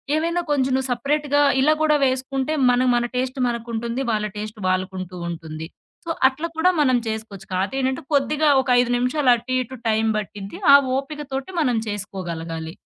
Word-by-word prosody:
ఏవైనా 335 +3 0
కొంచెం 265 -2 +1
నువ్వు 265 0 -1
సపరేట్‌‌గా 290 +3 +1 0.2
ఇలా 300 +3 +5
కూడా 305 -1 +4
వేసుకుంటే, 265 +2 -1 0.2
మన 245 0 +3
మన 240 0 +1
టేస్ట్ 255 +2 -2
మనకుంటుంది. 235 +1 -3
వాళ్ళ 210 -1 0
టేస్ట్ 215 +1 -6
వాళ్ళకుంటూ 185 0 -3
ఉంటుంది. 160 -1 -7 0.4
సో, - - -6 0.2
అట్లా 300 +5 -5
కూడా 340 +3 +4
మనం 255 -3 +3
చేసుకోవచ్చు. 220 -3 -6
కాతేంటంటే 260 +8 -1
కొద్దిగా 295 +2 +2
ఒక 265 - -6
5 245 0 -1
నిమిషాలు 250 +2 +2
అటు, 240 +2 -8
ఇటు 260 +2 -10
టైం 220 0 +2
పట్టిద్ది. 200 -1 -8
ఆ - - +12 0.2
ఓపికతోటి 275 +1 -5
మనం 250 -6 +1
చేసుకోగలగాలి. 170 -5 -5
250 Hz, 155 wpm, -22 LUFS, 210-275 Hz, 0.4 s, ఆ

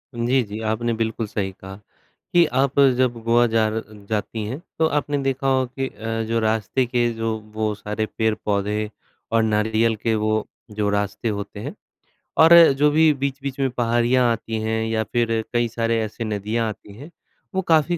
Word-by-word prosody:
जी, 120 +3 +2
जी, 105 +1 -7
आपने 115 +2 -1
बिल्कुल 110 0 -2
सही 100 -2 -3
कहा, 95 +1 -11 0.6
कि 175 -1 +6
आप 135 +2 0 0.2
जब 120 -3 +1
गोवा 120 +1 +4
जा 110 -1 +2
र 110 - -2 0.3
जाती 110 0 -2
हैं, 130 +9 -5 0.2
तो 160 - +4
आपने 145 0 -1
देखा 135 0 -1
होगा 130 -1 +2
कि 135 - 0
अ, 115 +1 -4
जो 115 +1 +1
रास्ते 110 +3 0
के 120 -1 +1
जो 115 -1 -2 0.2
वो 110 -1 -1
सारे 105 +1 -3
पेड़-पौधे 105 -1 0 0.4
और 115 -1 +3
नारियल 110 +1 +1
के 110 +1 -1
वो 110 0 0 0.3
जो 105 -1 -1
रास्ते 105 +2 -1
होते 100 0 -7
हैं - - -6 0.7
और 165 - +8 0.3
जो 150 - +5
भी 160 0 +5
बीच-बीच 140 0 -3
में 135 -1 +2
पहाड़ियाँ 120 +1 +2
आती 115 0 -3
हैं 110 0 -1
या 110 0 0
फिर 115 +1 0
कई 120 0 +2
सारे 115 0 0
ऐसे 110 +2 -5
नदियाँ 110 +2 -1
आती 105 -1 -10
हैं, 150 +6 -11 0.4
वो 190 - +2
काफ़ी 160 +2 +3
115 Hz, 175 wpm, -22 LUFS, 110-125 Hz, 0.7 s, और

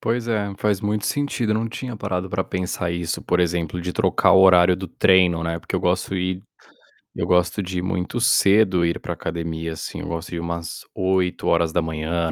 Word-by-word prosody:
Pois 120 +1 -1
é, 105 -3 -1
faz 105 -3 0
muito 105 0 -1
sentido. 140 -6 -1
Eu - - +3
não 115 +1 -1
tinha 120 0 -6
parado 95 -2 -3
para 95 +1 -1
pensar 90 -1 -3
isso, 85 -1 -3
por 90 - +1
exemplo, 85 -1 -1
de 90 +1 -4
trocar - - +3
o 95 - +7
horário 90 -1 +6
do 95 0 -6
treino, 90 -1 +3
né, 85 0 -2
porque - - -7
eu - - +1
gosto - - 0
ir 90 0 -2 0.7
eu - - -3
gosto 90 +3 +2
de 90 -1 -3
ir - - -2
muito 90 +6 -2
cedo, 100 -6 +4
ir 85 - 0
para - - -5
academia 80 0 -4
assim. 80 - -6
Eu - - -6
gosto 85 +1 -5
de 85 - -4
umas 85 0 -5
8h, 85 -3 0
90 Hz, 195 wpm, -22 LUFS, 85-100 Hz, 0.7 s, o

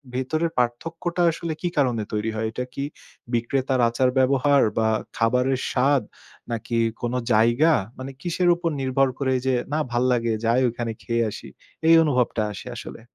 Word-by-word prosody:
ভেতরের 155 +6 -1
পার্থক্যটা 165 +9 -1
আসলে 165 0 -4
কি 175 - 0
কারণে 125 -6 +1
তৈরি 105 +1 -1
হয়? 110 - -1
এটা 125 +2 -4
কি 140 - -3 0.5
বিক্রেতার 130 +2 0
আচার-ব্যবহার 130 +3 +3 0.2
বা 110 0 +3 0.3
খাবারের 125 +3 +2
স্বাদ 135 +1 +2 0.5
নাকি 115 +1 -2 0.2
কোন 120 +1 -2 0.2
জায়গা? 120 +9 +4 0.2
মানে 130 +1 -6
কিসের 175 0 +1
উপর 170 -1 -2
নির্ভর 135 +1 +2
করে 130 -2 +1
যে, 130 - +2 0.2
"না 155 - +1
ভাল্লাগে। 120 -1 +1
যাই 120 +3 +3
ওখানে 120 0 -4
খেয়ে 115 0 0
আসি।" - - -9 0.4
এই 165 - +8
অনুভবটা 125 -6 +1
আসে 100 - -9
আসলে? 115 - -9
130 Hz, 150 wpm, -24 LUFS, 120-140 Hz, 0.5 s, এই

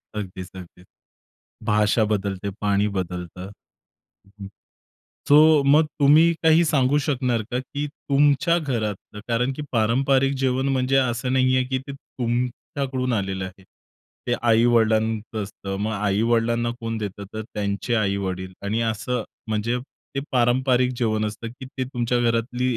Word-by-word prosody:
अगदीच, 95 -3 -6
अगदीच. 90 -1 -12 0.8
भाषा 105 +1 +2
बदलते, 100 -2 -2
पाणी 100 0 +2
बदलतं. 90 +1 -5 0.8
हं, - - -23
हं, 95 - -7 0.8
सो 150 0 +7
मग 150 +3 +5
तुम्ही 155 +4 +6
काही 160 +1 +5
सांगू 145 -2 +2
शकणार 130 -5 0
का, 125 - -1
की 145 +3 -5
तुमच्या 145 +4 +2
घरातलं, 110 - -4
कारण 125 +3 +1
की 150 - -4
पारंपरिक 135 +4 +2
जेवण 130 +1 +1
म्हणजे 135 0 +1
असं 125 -1 0
नाहीये, 130 0 +3
की 130 +1 -2
ते 135 +2 -9
तुमच्याकडून 125 +1 -3
आलेलं 95 -3 -2
आहे. 95 +1 -10 0.6
ते 120 - +1
आई-वडिलांचं 110 -2 +2
असतं. 100 -1 -6
मग 110 +2 -1
आई-वडिलांना 115 +3 +1
कोण 115 0 -3
देतं, 100 -1 -5
तर 110 - -3
त्यांचे 100 +3 -2
आई-वडील 95 -3 -1
आणि 105 +3 -1
असं 115 +2 -1 0.3
म्हणजे 110 +3 0 0.4
ते 135 - -1
पारंपरिक 125 0 +2
जेवण 110 -3 0
असतं, 110 +2 -5
की 130 +3 -10
ते 130 0 -4
तुमच्या 120 -1 -1
घरातली 120 +1 0
120 Hz, 135 wpm, -23 LUFS, 105-130 Hz, 0.8 s, सो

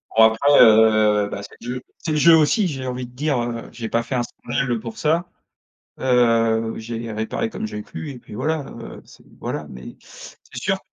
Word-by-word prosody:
Bon 110 - +7
après, 110 +6 +4
heu, 110 -2 +5
bah 100 - -5
c'est - - -12
le 125 +2 -4
jeu 125 - -6 0.2
c'est 160 - -3
le 155 - +1
jeu 165 +2 +7
aussi 160 +7 +3
j'ai 135 -5 -5
envie 125 0 -4
de 120 - -14
dire, 140 0 -1
heu, 120 -1 -5
j'ai 115 -2 -6
pas 115 +1 0
fait 125 +3 -4
un 120 - +1
scandale, 120 +2 -3
heu, 115 - 0
pour 115 0 -8
ça, 165 +3 0 0.7
heu, 115 -3 +2
j'ai 115 0 -6
réparé 110 +1 -3
comme - - -5
j'ai 105 0 -6
pu 150 - -8
et 130 - -9
puis 105 - -13
voilà, 155 +4 -1 0.2
heu, - - -10
c'est - - -19
voilà 75 - -4
mais 65 -1 -10
c'est - - -14 0.2
sûr - - 0
120 Hz, 215 wpm, -21 LUFS, 110-135 Hz, 0.7 s, Bon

